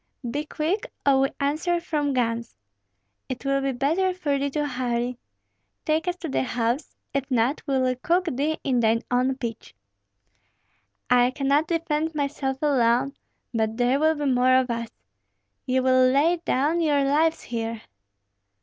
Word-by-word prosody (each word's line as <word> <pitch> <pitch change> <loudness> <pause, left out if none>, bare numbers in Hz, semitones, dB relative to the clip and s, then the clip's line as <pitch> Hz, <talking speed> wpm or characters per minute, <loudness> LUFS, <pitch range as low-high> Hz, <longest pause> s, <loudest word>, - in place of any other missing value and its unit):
"Be 295 +3 -2
quick, 360 +12 -2
or 275 -1 +5
we 270 0 +3
answer 310 +5 0
from 300 -4 -1
guns. 230 - -1 0.7
It 260 +1 -5
will 275 0 +1
be 275 0 0
better 325 +9 0
for 290 -6 -1
thee 280 +1 0
to 295 +1 -1
hurry. 245 -2 -2 0.7
Take 315 +3 0
us 355 - 0
to 330 - -3
the 270 - 0
house; 245 +2 -2 0.2
if 275 0 -2
not, 250 +3 +1
we 275 -1 +1
will 255 -1 +2
cook 355 +5 +2
thee 305 +1 -1
in 255 -3 +1
thy 225 0 +2
own 255 +2 +2
pitch." 230 - -6 1.4
"I 245 0 +5
cannot 280 +4 +1
defend 320 -1 -1
myself 280 -2 -2
alone, 260 -1 +2 0.4
but 220 -1 -1
there 250 +3 +2
will 315 +1 +3
be 295 -1 -3
more 255 -1 +4
of 260 -1 +2
us. 230 -1 -3 0.8
Ye 260 0 +2
will 255 0 +4
lay 300 +7 +3
down 300 +6 +1
your 290 -3 +2
lives 310 +4 +2
here." 230 -1 -4
275 Hz, 160 wpm, -25 LUFS, 250-305 Hz, 1.4 s, or